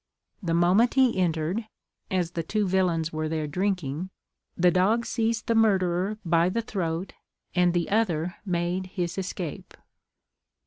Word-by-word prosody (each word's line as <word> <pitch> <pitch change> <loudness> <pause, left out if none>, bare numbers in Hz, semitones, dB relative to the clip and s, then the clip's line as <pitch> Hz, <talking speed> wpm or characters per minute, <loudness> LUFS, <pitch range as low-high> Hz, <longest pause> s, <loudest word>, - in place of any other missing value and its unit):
The 165 -4 0
moment 185 +9 +4
he 260 -3 +4
entered, 175 +5 0 0.4
(as 180 -2 0
the 170 - -2
two 205 +5 -1
villains 175 -4 +1
were 155 0 -2
there 155 -1 -1
drinking,) 180 -1 -2 0.5
the 180 0 +4
dog 210 +6 +2
seized 225 -1 -1
the 230 - +1
murderer 195 -2 +2
by 170 +1 +3
the 230 +5 -1
throat, 180 -4 -3 0.4
and 180 0 +3
the 170 -1 0
other 175 -6 0
made 180 0 -1
his 180 -1 -3
escape. 180 -4 -5
180 Hz, 140 wpm, -26 LUFS, 170-200 Hz, 0.5 s, moment